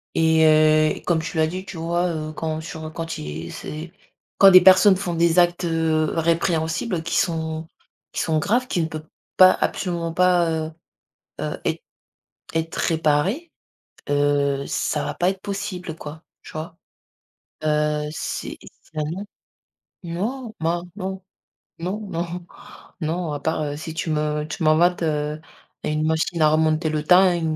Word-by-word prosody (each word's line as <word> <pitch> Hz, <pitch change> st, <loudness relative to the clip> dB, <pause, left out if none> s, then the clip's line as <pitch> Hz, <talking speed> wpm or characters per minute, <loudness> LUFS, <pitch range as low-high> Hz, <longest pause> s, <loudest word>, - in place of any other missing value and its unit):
et 160 Hz, -1 st, +4 dB
heu, 155 Hz, 0 st, +4 dB
comme 165 Hz, -2 st, +2 dB
tu 160 Hz, 0 st, -5 dB
l'as 160 Hz, -, +4 dB
dit 185 Hz, +4 st, -5 dB
tu 175 Hz, -, -8 dB
vois, 170 Hz, +2 st, 0 dB
heu, 155 Hz, -2 st, -4 dB
quand 160 Hz, 0 st, -3 dB
sur, 160 Hz, 0 st, -8 dB
heu, -, -, -5 dB
quand 165 Hz, 0 st, -5 dB
il 75 Hz, +2 st, -6 dB
c'est 160 Hz, +3 st, -7 dB, 0.5 s
quand 195 Hz, -, +10 dB
des 185 Hz, -, +9 dB
personnes 190 Hz, +2 st, +7 dB
font 180 Hz, -2 st, -3 dB
des 170 Hz, +1 st, +2 dB
actes, 175 Hz, 0 st, +2 dB
heu, 160 Hz, -1 st, +1 dB
répréhensibles 165 Hz, +3 st, 0 dB
qui 165 Hz, +1 st, -2 dB
sont 160 Hz, -2 st, -1 dB, 0.4 s
qui -, -, -2 dB
sont 160 Hz, -2 st, +1 dB
graves, 240 Hz, +10 st, +1 dB
qui 175 Hz, -, 0 dB
ne 160 Hz, -, 0 dB
peut 155 Hz, -1 st, -7 dB, 0.3 s
pas 185 Hz, 0 st, +9 dB
absolument 170 Hz, -3 st, -2 dB
pas, 180 Hz, -2 st, +3 dB, 0.2 s
heu, -, -, -9 dB, 0.7 s
heu -, -, -3 dB
êt -, -, -1 dB, 0.7 s
être 165 Hz, 0 st, -2 dB
réparées, 165 Hz, -, +1 dB, 0.6 s
heu, 145 Hz, -1 st, +2 dB
ça 150 Hz, -, -1 dB
va -, -, -3 dB
pas 180 Hz, +1 st, +2 dB
être 190 Hz, -1 st, -4 dB
possible 180 Hz, -4 st, -5 dB
quoi, 155 Hz, +1 st, -9 dB, 0.2 s
tu -, -, -11 dB
vois? 160 Hz, +2 st, -6 dB, 0.9 s
Heu, 150 Hz, 0 st, +1 dB
c'est -, -, -5 dB, 0.4 s
ben, 155 Hz, -, -1 dB
non. 195 Hz, +4 st, -5 dB, 0.8 s
Non, 215 Hz, +8 st, -4 dB
bah 170 Hz, +2 st, 0 dB
non, 190 Hz, -1 st, -5 dB, 0.6 s
non, 185 Hz, +5 st, -3 dB
non, 170 Hz, +1 st, -4 dB, 0.6 s
non 165 Hz, 0 st, -2 dB
à 145 Hz, -, -4 dB
part, 160 Hz, 0 st, -1 dB
heu, 145 Hz, -1 st, -3 dB
si 160 Hz, +1 st, -6 dB
tu 160 Hz, 0 st, -3 dB
me 150 Hz, 0 st, 0 dB
tu 155 Hz, +3 st, -5 dB
m'inventes, 170 Hz, +3 st, +3 dB
heu, 150 Hz, -1 st, -1 dB, 0.4 s
une 155 Hz, 0 st, 0 dB
machine 160 Hz, +1 st, 0 dB
à 155 Hz, -, +6 dB
remonter 155 Hz, +1 st, +2 dB
le 155 Hz, -1 st, -1 dB
temps 185 Hz, +2 st, +6 dB
et 170 Hz, -, -1 dB
165 Hz, 160 wpm, -23 LUFS, 155-175 Hz, 0.9 s, quand